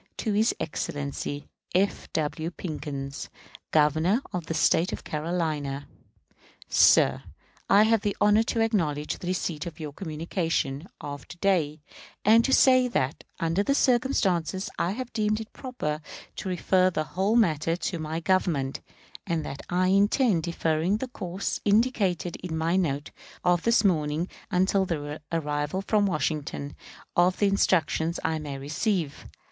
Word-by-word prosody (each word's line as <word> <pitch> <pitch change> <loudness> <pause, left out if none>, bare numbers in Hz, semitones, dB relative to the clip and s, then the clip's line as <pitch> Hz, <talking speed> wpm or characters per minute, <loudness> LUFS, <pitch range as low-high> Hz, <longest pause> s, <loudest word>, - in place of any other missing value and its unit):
To 220 - -1
his 220 +3 +3
Excellency 145 -2 -4 0.3
F. 195 +2 +1
W. 155 +1 -1
PICKENS, 145 -5 -6 0.4
Governor 160 - +3
of 175 -4 -3
the 165 - -2
State 165 +2 +3
of - - -2
South - - -15
Carolina. 150 -3 -2 0.8
Sir: - - +5 0.5
I 200 +2 +7
have 225 -1 +3
the 205 -1 -2
honor 210 +1 +5
to 225 0 0
acknowledge 160 -10 0
the 175 - -7
receipt 175 -3 -2
of 170 - -8
your 150 -2 -6
communication 160 -2 -2
of 145 -1 -7
to 175 - -11
day, 165 -6 +1 0.4
and 225 +2 +6
to 265 - 0
say 255 -1 +6
that, 145 - -1 0.2
under 165 +3 +1
the 275 +7 +1
circumstances, 195 - +1
I 175 - +1
have 250 +2 -6
deemed 215 -1 +1
it 220 - -9
proper 165 - -4 0.4
to 190 - -4
refer 185 +1 +3
the 155 -4 -1
whole 190 +7 0
matter 165 -7 +2
to 175 0 -3
my 160 +1 -3
Government; 165 -7 0 0.5
and 165 -4 -1
that 140 - -6
I 185 +1 +2
intend 200 - +3
deferring 170 +2 0
the 255 +3 -5
course 185 -5 -4
indicated 205 -5 +1
in 170 -3 -5
my 165 +2 +1
note 150 -6 -1 0.3
of 175 -1 +3
this 230 +1 +3
morning 160 -2 +1 0.2
until 190 +2 +2
the 150 -4 -4
arrival 150 +2 -1
from 205 0 +2
Washington 150 -4 -2 0.4
of 180 +1 +3
the 205 - +2
instructions 170 -4 +2
I 160 -1 0
may 145 -2 -5
receive. 155 +2 -2
175 Hz, 150 wpm, -27 LUFS, 155-200 Hz, 0.8 s, I